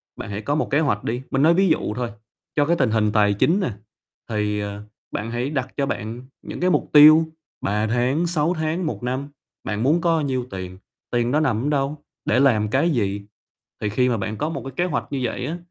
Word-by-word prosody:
bạn -, -, -7 dB
hãy 100 Hz, +1 st, -4 dB
có 145 Hz, +7 st, -1 dB
một -, -, -1 dB
kế 145 Hz, -, +3 dB
hoạch 135 Hz, -10 st, 0 dB
đi. 120 Hz, +2 st, -2 dB
Mình 135 Hz, -, +1 dB
nói 160 Hz, +3 st, +6 dB
ví 190 Hz, +2 st, +3 dB
dụ 155 Hz, -9 st, +1 dB
thôi, 120 Hz, -1 st, -2 dB, 0.5 s
cho 145 Hz, -, +3 dB
cái 170 Hz, +3 st, +2 dB
tình 110 Hz, -, +1 dB
hình 110 Hz, -1 st, +2 dB
tài 105 Hz, -1 st, +3 dB
chính 165 Hz, -, +2 dB
nè, 185 Hz, -, -1 dB, 0.6 s
thì, 105 Hz, -1 st, -1 dB
ờ, 100 Hz, 0 st, -5 dB, 0.3 s
bạn 110 Hz, +3 st, -4 dB
hãy 120 Hz, +3 st, -2 dB
đặt 130 Hz, -4 st, -2 dB
cho 140 Hz, -, +1 dB
bạn 115 Hz, -2 st, -4 dB, 0.2 s
những -, -, -7 dB
cái 180 Hz, +1 st, +2 dB
mục -, -, +1 dB
tiêu, 155 Hz, +2 st, +9 dB, 0.4 s
3 105 Hz, +2 st, 0 dB
tháng, 125 Hz, +9 st, +1 dB
6 165 Hz, 0 st, +1 dB
tháng, 160 Hz, +2 st, -2 dB
1 155 Hz, -, -4 dB
năm, 130 Hz, +3 st, -2 dB, 0.4 s
bạn 105 Hz, +1 st, -2 dB
muốn 155 Hz, +6 st, +3 dB
có 165 Hz, -2 st, +2 dB
nhiêu 130 Hz, -4 st, -1 dB
tiền, 95 Hz, -1 st, -6 dB, 0.3 s
tiền 120 Hz, 0 st, +1 dB
đó 150 Hz, -, +3 dB
nằm 125 Hz, -7 st, +1 dB
ở 145 Hz, -, +1 dB
đâu, 140 Hz, 0 st, 0 dB, 0.3 s
để -, -, +2 dB
làm 110 Hz, -6 st, +3 dB
cái 140 Hz, +8 st, +2 dB
gì? 100 Hz, -8 st, 0 dB, 0.6 s
Thì 105 Hz, -, 0 dB
khi 125 Hz, +5 st, +2 dB
mà 120 Hz, -, +1 dB
bạn 105 Hz, +2 st, -4 dB
có 150 Hz, -, -1 dB
một 145 Hz, -5 st, -4 dB
cái 135 Hz, -, -6 dB
kế 175 Hz, -, +1 dB
hoạch 180 Hz, -, -2 dB
như 140 Hz, -, -1 dB
vậy 125 Hz, +1 st, -2 dB
á, 160 Hz, +5 st, -3 dB
130 Hz, 235 wpm, -22 LUFS, 110-155 Hz, 0.6 s, tiêu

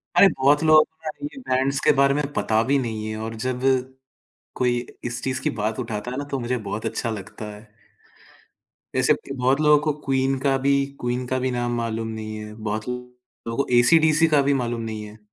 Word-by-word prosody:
अरे! 200 Hz, -, +8 dB
बहुत 145 Hz, +2 st, +4 dB
लोगों 155 Hz, -1 st, +7 dB
को 160 Hz, -, -24 dB
यार 155 Hz, -, -5 dB, 0.2 s
ये 280 Hz, -, -13 dB
बैंड्स 135 Hz, -, 0 dB
के -, -, +6 dB
बारे 140 Hz, 0 st, +5 dB
में 150 Hz, -, 0 dB
पता 110 Hz, -5 st, +1 dB
भी 140 Hz, +3 st, +2 dB
नहीं 110 Hz, -3 st, -3 dB
है 110 Hz, -, -4 dB
और 115 Hz, +1 st, -5 dB
जब, 125 Hz, +2 st, -3 dB, 0.9 s
कोई 125 Hz, -1 st, +1 dB, 0.3 s
इस 120 Hz, -1 st, -4 dB
चीज़ 130 Hz, 0 st, -1 dB
की -, -, +1 dB
बात 110 Hz, +2 st, -1 dB
उठाता 115 Hz, -1 st, -4 dB
है 130 Hz, -, -5 dB
ना, 145 Hz, -, -3 dB
तो 140 Hz, -1 st, -3 dB
मुझे 125 Hz, +1 st, -1 dB
बहुत 110 Hz, -, -3 dB
अच्छा 115 Hz, -, -2 dB
लगता 105 Hz, 0 st, -7 dB
है। 105 Hz, -, -12 dB, 1.4 s
ऐसे -, -, +4 dB, 0.2 s
बहुत 135 Hz, +2 st, +1 dB
लोगों 150 Hz, -1 st, +6 dB
को 150 Hz, -, +2 dB
क्वीन 135 Hz, 0 st, +1 dB
का 135 Hz, 0 st, +1 dB
भी, 140 Hz, +1 st, +2 dB, 0.2 s
क्वीन 125 Hz, +1 st, -2 dB
का 130 Hz, +1 st, -1 dB
भी 130 Hz, 0 st, -1 dB
नाम 120 Hz, -1 st, -1 dB
मालूम 115 Hz, -1 st, -2 dB
नहीं 110 Hz, -1 st, -5 dB
है, 105 Hz, 0 st, -8 dB
बहुत 110 Hz, +1 st, -4 dB
लोगों 125 Hz, -1 st, -8 dB
को -, -, -14 dB
एसी 160 Hz, +7 st, +6 dB
डीसी 155 Hz, 0 st, +4 dB
का 140 Hz, -, +5 dB
भी 140 Hz, +1 st, +2 dB
मालूम 120 Hz, 0 st, -3 dB
नहीं 110 Hz, -1 st, -5 dB
है। 105 Hz, +1 st, -12 dB
125 Hz, 210 wpm, -23 LUFS, 110-140 Hz, 1.4 s, अरे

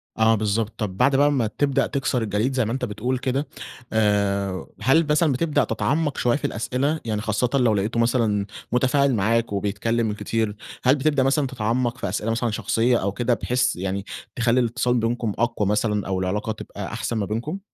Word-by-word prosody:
آه، 110 Hz, 0 st, +4 dB
بالضبط. 110 Hz, +1 st, -1 dB
طب 95 Hz, -4 st, -3 dB
بعد 135 Hz, +4 st, +3 dB
بقي 145 Hz, +1 st, +4 dB
ما 125 Hz, -6 st, +1 dB
تبدأ 140 Hz, +5 st, +1 dB
تكسر 135 Hz, -3 st, -1 dB
الجليد 110 Hz, +5 st, 0 dB
زي 130 Hz, -4 st, +1 dB
ما 110 Hz, -, -2 dB
أنت 130 Hz, 0 st, -1 dB
بتقول 125 Hz, +4 st, -2 dB
كده 130 Hz, +3 st, -1 dB, 0.5 s
آآ، 100 Hz, -3 st, +1 dB
هل 160 Hz, +4 st, +4 dB
مثلًا 150 Hz, 0 st, +3 dB
بتبدأ 145 Hz, +1 st, +1 dB
تتعمق 140 Hz, +6 st, -1 dB
شوية 120 Hz, +2 st, +2 dB
في -, -, -5 dB
الأسئلة؟ 135 Hz, +7 st, -1 dB
يعني 105 Hz, -2 st, -1 dB
خاصةً 110 Hz, +3 st, 0 dB
لو 125 Hz, -5 st, +3 dB
لاقيته 105 Hz, +3 st, 0 dB
مثلًا 115 Hz, -4 st, +2 dB, 0.3 s
متفاعل 130 Hz, +2 st, +3 dB
معاك 115 Hz, +2 st, +1 dB
وبيتكلم 105 Hz, +3 st, 0 dB
كتير. 110 Hz, 0 st, -2 dB, 0.3 s
هل 130 Hz, +3 st, +5 dB
بتبدأ 145 Hz, -1 st, +2 dB
مثلًا 135 Hz, +1 st, +2 dB
تتعمق 120 Hz, 0 st, -1 dB
في 100 Hz, -7 st, -3 dB
أسئلة 105 Hz, +3 st, -1 dB
مثلًا 115 Hz, 0 st, 0 dB
شخصية 115 Hz, +3 st, +1 dB
أو 100 Hz, -2 st, -1 dB
كده 120 Hz, +3 st, 0 dB
بحيث 125 Hz, +3 st, 0 dB
يعني 95 Hz, +2 st, -3 dB, 0.3 s
تخلي 120 Hz, +1 st, +2 dB
الإتصال 125 Hz, +1 st, +1 dB
بينكم 115 Hz, -2 st, -1 dB
أقوى 120 Hz, -4 st, +1 dB
مثلًا 105 Hz, -1 st, 0 dB
أو 95 Hz, -1 st, -1 dB
العلاقة 105 Hz, +4 st, -1 dB
تبقى 110 Hz, -, -7 dB
أحسن 115 Hz, -, -2 dB
ما 105 Hz, -, 0 dB
بينكم؟ 120 Hz, -, -3 dB
115 Hz, 185 wpm, -23 LUFS, 105-130 Hz, 0.5 s, هل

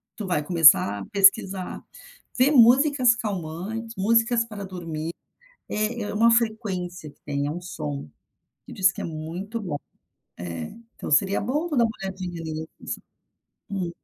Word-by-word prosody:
Tu 210 Hz, -, -6 dB
vai 165 Hz, -5 st, 0 dB
começar 155 Hz, -, +5 dB
a 100 Hz, -, -7 dB
pesquisar, 195 Hz, -1 st, +3 dB, 0.6 s
ver 265 Hz, +4 st, +4 dB
músicas 255 Hz, 0 st, +5 dB
calmantes, 210 Hz, +2 st, -5 dB
músicas 230 Hz, +3 st, +3 dB
para 205 Hz, -3 st, -7 dB
dormir. 165 Hz, -3 st, -5 dB, 0.6 s
É 215 Hz, +2 st, -1 dB
é -, -, -4 dB
uma 230 Hz, +3 st, +4 dB
frequência 195 Hz, -8 st, -1 dB
que -, -, -30 dB
tem, 140 Hz, 0 st, -2 dB
é 145 Hz, -, -2 dB
um 175 Hz, -, -5 dB
som 75 Hz, -, -5 dB, 0.6 s
que -, -, -10 dB
diz 190 Hz, 0 st, +3 dB
que -, -, -9 dB
é -, -, -5 dB
muito 170 Hz, +8 st, -5 dB
bom. 170 Hz, -8 st, -3 dB, 0.6 s
Eh, 85 Hz, -2 st, -6 dB, 0.2 s
então -, -, -7 dB
seria 190 Hz, +7 st, +3 dB
bom 290 Hz, +10 st, -1 dB
tu 300 Hz, -, -2 dB
dar 235 Hz, -, +5 dB
uma 220 Hz, -, -2 dB
olhadinha 185 Hz, -3 st, -5 dB, 0.4 s
nisso. -, -, -6 dB, 0.7 s
Hum. 185 Hz, -4 st, -2 dB
195 Hz, 155 wpm, -25 LUFS, 165-230 Hz, 0.7 s, começar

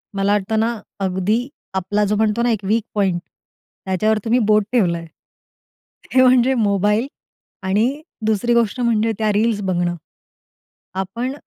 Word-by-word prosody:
मला 195 Hz, +1 st, +1 dB
वाटतं 210 Hz, +2 st, 0 dB
ना 230 Hz, +1 st, +1 dB, 0.3 s
अगदी 195 Hz, +6 st, 0 dB, 0.3 s
आपला 205 Hz, +3 st, 0 dB
जो 210 Hz, +1 st, 0 dB
म्हणतो 220 Hz, +1 st, +1 dB
ना 240 Hz, -, +2 dB
एक 220 Hz, -, 0 dB
वीक 220 Hz, +3 st, +1 dB
पॉइंट, 190 Hz, -4 st, +1 dB, 0.7 s
त्याच्यावर 205 Hz, +4 st, +1 dB
तुम्ही 235 Hz, +2 st, +3 dB
बोट 215 Hz, 0 st, +4 dB
ठेवलंय. 170 Hz, -8 st, +1 dB, 1.1 s
हे 255 Hz, -, +6 dB
म्हणजे 255 Hz, 0 st, +5 dB
मोबाईल 210 Hz, +1 st, +1 dB, 0.6 s
आणि 220 Hz, +10 st, +1 dB, 0.2 s
दुसरी 220 Hz, +2 st, +1 dB
गोष्ट 235 Hz, 0 st, +1 dB
म्हणजे 225 Hz, -1 st, +2 dB
त्या 215 Hz, -1 st, +2 dB
रील्स 215 Hz, 0 st, +1 dB
बघणं. 175 Hz, -2 st, 0 dB, 1.0 s
आपण 230 Hz, +7 st, -3 dB
215 Hz, 135 wpm, -20 LUFS, 195-235 Hz, 1.1 s, हे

